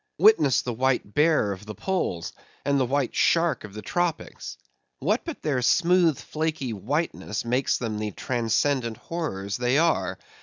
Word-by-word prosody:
Witness 160 - +5
the 120 - -3
white 125 -3 0
bear 150 -8 +3
of 100 +2 -7
the 110 - -6
poles, 135 - -2 0.3
and 140 -1 +2
the 130 - +1
white 140 0 0
shark 170 -1 +2
of 105 -1 -10
the 105 - -7
tropics; 175 - -3 0.4
what - - 0
but 330 -4 -7
their 140 -5 0
smooth, 170 +3 +4
flaky 155 -6 -3
whiteness 120 - -2
makes 125 +3 +1
them 110 -3 -3
the 105 0 -2
transcendent 120 +1 0
horrors 105 - -4
they 125 +2 +2
are? 165 +1 +1
130 Hz, 155 wpm, -25 LUFS, 110-160 Hz, 0.4 s, Witness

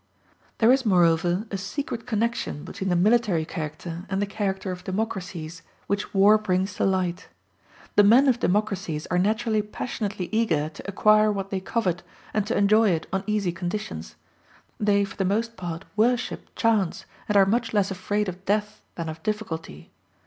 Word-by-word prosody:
There 225 +1 +5
is 265 0 +3
moreover 175 -1 +3
a 195 - -2
secret 230 +3 -4
connection 230 -9 -1
between 190 +1 -4
the 175 - +2
military 200 -3 +3
character 165 +3 -6
and 195 -1 -1
the 205 - +1
character 195 -2 -2
of 180 0 -7
democracies, 185 -5 -4 0.2
which 200 +1 -2
war 205 +2 +6
brings 190 -2 0
to - - +1
light. 185 -2 0 0.7
The 205 - +7
men 240 +7 +6
of 250 -2 +3
democracies 190 -7 -1
are 180 - +3
naturally 220 +2 +1
passionately 205 -3 -4
eager 170 -10 +1
to 160 - -11
acquire 215 +1 +4
what 195 -1 -4
they 195 - -1
covet, 185 -3 -1 0.3
and 210 -1 0
to 235 - 0
enjoy 215 +2 +4
it 165 -3 0
on 190 0 0
easy 210 -4 0
conditions. 175 - -5 0.6
They 205 -1 +3
for 195 - -11
the 195 - +1
most 225 +5 0
part 175 -2 -6
worship 240 +3 0
chance, 215 -6 +1 0.2
and 210 - +2
are 195 - +7
much 225 +3 0
less 205 -2 +1
afraid 205 +2 -1
of 185 +1 -6
death 210 +2 -1
than 170 -1 -4
of 160 0 -6
difficulty. 165 - -5
200 Hz, 170 wpm, -25 LUFS, 180-215 Hz, 0.7 s, The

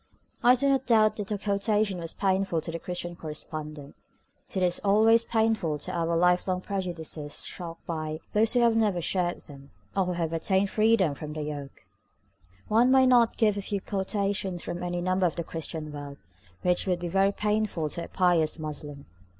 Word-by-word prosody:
I 245 +1 +7
do 280 +2 +1
not 270 -1 +1
doubt 215 -2 +4
that 205 -2 -4
the 210 -2 -2
quotation 200 -1 0
was 165 -1 -4
painful 190 -3 +1
to 165 - -5
the 165 - -4
Christian 175 0 -4
correspondent, 150 -2 -7 0.5
since 190 - -1
it - - +5
is 175 -1 +2
always 220 +3 +4
painful 220 -10 0
to - - -7
have 170 -1 -1
our 170 - +1
lifelong 180 +1 +2
prejudices 170 -6 -3
shocked 170 -2 -7
by 155 -2 -4
those 220 +2 +3
who 245 - +3
have 235 -1 +4
never 210 -5 +2
shared 175 +1 -1
them, 140 -2 -13 0.3
or 195 -1 +2
who 180 - -2
have 165 -2 -2
attained 190 +4 +1
freedom 215 -7 +3
from 150 +1 -7
their 155 -1 -4
yoke. 145 -2 -7 0.8
One 230 +4 +4
might 265 0 +6 0.3
give 210 -3 +2
not - - -1
a 200 - -7
few 200 - -1
quotations 195 -2 -2
from 175 0 -5
any 175 0 -2
number 185 +1 +2
of 165 - -4
the 170 - -3
Christian 160 -1 -5
World 145 -1 -8 0.5
which 180 +2 +1
would 180 -1 +1
be 175 - -4
very 195 +3 +2
painful 210 -6 -1
to 170 +3 -4
a - - -11
pious 175 -4 +2
Muslim. 150 -2 -6
180 Hz, 190 wpm, -27 LUFS, 160-210 Hz, 0.8 s, I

